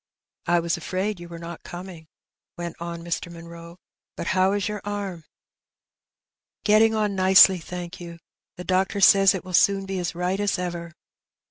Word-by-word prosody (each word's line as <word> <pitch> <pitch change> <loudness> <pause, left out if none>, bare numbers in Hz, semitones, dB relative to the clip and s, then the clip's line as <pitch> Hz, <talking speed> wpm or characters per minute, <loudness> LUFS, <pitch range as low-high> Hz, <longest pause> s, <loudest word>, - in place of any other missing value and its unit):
^^ - - 0
I 175 - +4
was 170 +1 -1
afraid 185 +4 -3
you 175 0 -10
were 170 - -8
not 170 0 -8
coming," 175 -2 -10 0.5
went 175 -1 -5
on 170 0 -6
Mr. 170 0 -4
Munroe; 170 0 -11
*^ - - -22 0.4
but - - -4
how 185 +1 +2
is 205 0 -1
your 210 -1 -4
arm? 200 -4 -4
" - - -20
^^ - - -31 1.4
Getting 220 +1 +4
on 210 -2 0
nicely, 190 0 +7
thank 175 +1 -7
you; 170 -1 -9 0.4
the 180 - -7
doctor 190 +2 0
says 195 0 +6
it 185 - -6
will 185 - -8
soon 195 +2 +3
be 190 -1 -3
as 175 -1 -3
right 180 +3 -1
as 205 -1 0
ever." 170 -2 -5
180 Hz, 190 wpm, -24 LUFS, 170-195 Hz, 1.4 s, nicely